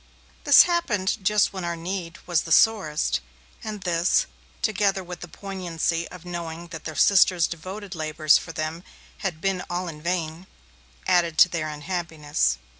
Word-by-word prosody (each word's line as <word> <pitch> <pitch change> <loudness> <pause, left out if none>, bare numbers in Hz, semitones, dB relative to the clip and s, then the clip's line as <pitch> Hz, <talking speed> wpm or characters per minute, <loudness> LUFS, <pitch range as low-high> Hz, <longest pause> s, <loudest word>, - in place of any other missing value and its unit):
This - - +9
happened 210 - 0
just 210 +1 +3
when 190 -2 -5
our 170 0 -2
need 170 0 -5
was 175 -3 +1
the 165 - -8
sorest, 160 - +3 0.4
and 215 -2 -5
this, 175 -1 +2 0.4
together 200 -2 +1
with 180 0 -8
the 175 - -8
poignancy 170 -3 -3
of 180 -1 -12
knowing 170 -1 -6
that 160 -2 -9
their 155 - -5
sister's 180 -2 +5
devoted 190 +4 -7
labours 155 -2 +3
for - - -8
them 160 +1 -4 0.4
had 175 -5 -3
been 195 -2 0
all 175 +1 -2
in 150 -3 -8
vain, 170 0 -3 0.6
added 170 -3 +2
to 180 - +7
their 160 -3 -3
unhappiness. 150 - -1
175 Hz, 155 wpm, -25 LUFS, 160-190 Hz, 0.6 s, This